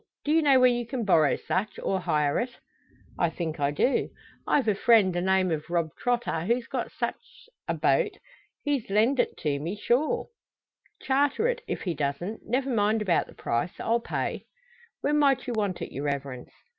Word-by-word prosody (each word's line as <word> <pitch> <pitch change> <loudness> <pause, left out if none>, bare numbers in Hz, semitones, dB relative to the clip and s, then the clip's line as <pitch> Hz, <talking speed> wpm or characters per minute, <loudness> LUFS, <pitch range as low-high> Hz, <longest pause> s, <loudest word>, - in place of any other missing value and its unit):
Do 295 - +1
you 325 +1 +4
know 275 -4 +5
where 255 - +7
you 240 -1 0
can 240 -2 -3
borrow 160 -7 +4
such, 200 +4 -2
or 190 - -1
hire 150 -4 +1
it?" 245 0 -4 0.6
"I 170 - +3
think 160 -1 -4
I 140 -1 +2
do. 150 - +1 0.4
I've 275 -5 +2
a 210 - +4
friend, 205 -3 +4
the 175 - -1
name 190 -1 +2
o' 155 -2 0
Rob 170 -2 0
Trotter, 240 -8 -1
who's 235 +3 +1
got - - -3
just - - -21
sich - - -5 0.2
a - - 0
boat. - - +1 0.5
He'd 285 -7 -1
lend 225 +7 +2
it - - +1 0.3
me, 170 +6 -3
sure." 240 +8 0 0.7
"Charter 285 - +2
it, - - -1
if - - -3
he 180 - -1
doesn't. 150 +8 -3
Never 260 +3 0
mind 215 -1 +2
about 180 -5 +1
the - - -15
price. 120 +9 -2
I'll 230 +1 +1
pay." - - -3 0.5
"When 295 +1 +2
might 275 -2 +3
you 245 - -3
want 205 -5 -1
it, - - -7
your 140 +2 -4
Reverence?" 140 -3 -4
210 Hz, 190 wpm, -27 LUFS, 170-255 Hz, 0.7 s, where